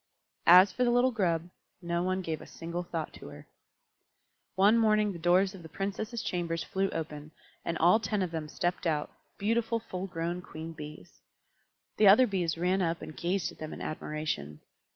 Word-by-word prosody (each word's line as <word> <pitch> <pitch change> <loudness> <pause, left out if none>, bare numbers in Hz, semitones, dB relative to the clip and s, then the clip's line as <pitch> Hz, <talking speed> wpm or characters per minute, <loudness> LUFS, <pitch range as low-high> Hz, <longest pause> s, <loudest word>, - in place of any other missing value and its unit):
As 185 +3 +9
for 250 - 0
the 245 - +3
little 245 +2 +4
Grub, 175 -7 0 0.3
no 170 -1 -1
one 185 +1 -1
gave 160 -3 -3
a - - -11
single 170 +1 -5
thought 165 -2 -5
to - - -11
her. - - -11 1.1
One 200 +4 +5
morning 215 -2 +3
the 170 - -8
doors 185 +3 +3
of 190 - -10
the 160 - -11
Princesses' 210 +6 -4
chambers 170 -2 -2
flew 195 0 -1
open, 150 -3 -5 0.3
and 170 - -2
all 180 +7 +5
ten 210 -3 -1
of 180 - -3
them 160 -2 -4
stepped 175 +1 -1
out, 150 -2 -1 0.3
beautiful 230 +2 0
full 190 -4 -6
grown 170 0 -3
Queen 160 -1 -8
Bees. 150 +2 -11 0.8
The 210 - +6
other 215 +7 +8
Bees 180 -7 -1
ran 180 +3 +1
up 165 -2 -1
and 155 0 -8
gazed 175 -1 -1
at - - -17
them 155 0 -6
in - - -8
admiration. 150 - -4
175 Hz, 185 wpm, -30 LUFS, 165-200 Hz, 1.1 s, As